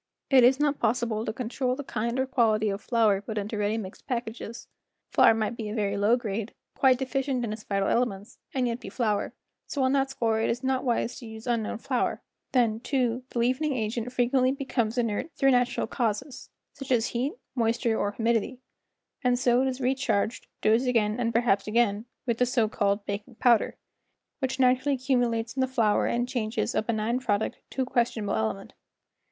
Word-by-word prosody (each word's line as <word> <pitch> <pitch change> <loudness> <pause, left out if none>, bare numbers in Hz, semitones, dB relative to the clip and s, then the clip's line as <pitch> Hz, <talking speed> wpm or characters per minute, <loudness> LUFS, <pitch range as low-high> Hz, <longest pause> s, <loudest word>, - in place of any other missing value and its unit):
It 260 -2 +7
is 260 +3 +5
not 295 -1 +1
possible 225 -1 0
to - - -1
control 250 +2 -2
the 285 - -6
kind 235 0 -2
or 260 - +2
quality 220 -5 +2
of 200 +1 -3
flour 220 -5 +2
put 215 +1 -6
into 210 +2 -3
ready 210 +1 0
mixed 195 -4 -8
packages; 235 -2 -5 0.4
flour 225 - +6
might 220 +1 -1
be 220 -2 -5
of 210 - -4
very 200 -2 0
low 205 +4 +3
grade, 220 -1 -4 0.2
quite 260 -2 +4
deficient 265 -1 -1
in 215 -1 -3
vital 195 -1 +1
elements, 230 -2 -1
and 255 -2 0
yet 235 0 -2
be - - -8
flour, 215 -5 -1 0.3
so 280 - -1
on 260 - +3
that 270 -1 +2
score 225 -4 0
it 225 - +1
is 245 +3 -2
not 260 0 0
wise 240 -1 -1
to 235 - -9
use 220 0 -9
unknown 230 -3 -1
flour; 250 +2 -1 0.3
then, 230 -4 +2
too, 250 -1 0
the - - -7
leavening 260 +5 +1
agent 225 +2 -2
frequently 255 +1 +2
becomes 255 -4 -2
inert 230 +4 -1
through 270 -1 +4
nat¬ 245 -1 +2
ural - - 0
causes, 245 +3 -3 0.2
such 275 -2 -8
as 235 -2 +2
heat, 255 +5 -1 0.2
moisture 230 -1 +1
or 205 -1 -1
humidity, 230 +2 0 0.6
and 250 -1 +3
so 245 0 +3
it 265 - +1
is 260 0 -3
re¬ 260 +1 +1
charged, 235 -3 -1 0.2
dosed 225 +4 +3
again 225 -2 +1
and 230 -1 +1
perhaps 225 -4 +2
again, 215 -1 +1 0.2
with 235 -2 -1
the 250 - +3
so 235 -3 +2
called 200 -1 0
baking 205 +4 -5
powder, 235 -1 +3 0.6
which 265 -1 -2
naturally 260 +2 +3
cumulates 245 -3 0
in 265 - 0
the 260 - +2
flour 230 -5 +2
and 240 +1 0
changes 235 -1 -2
a - - +2
benign 225 +2 -1
product 220 -4 -1
to 265 - -1
a - - -3
questionable 235 -5 0
element. 110 -2 -2
235 Hz, 195 wpm, -27 LUFS, 220-255 Hz, 0.6 s, It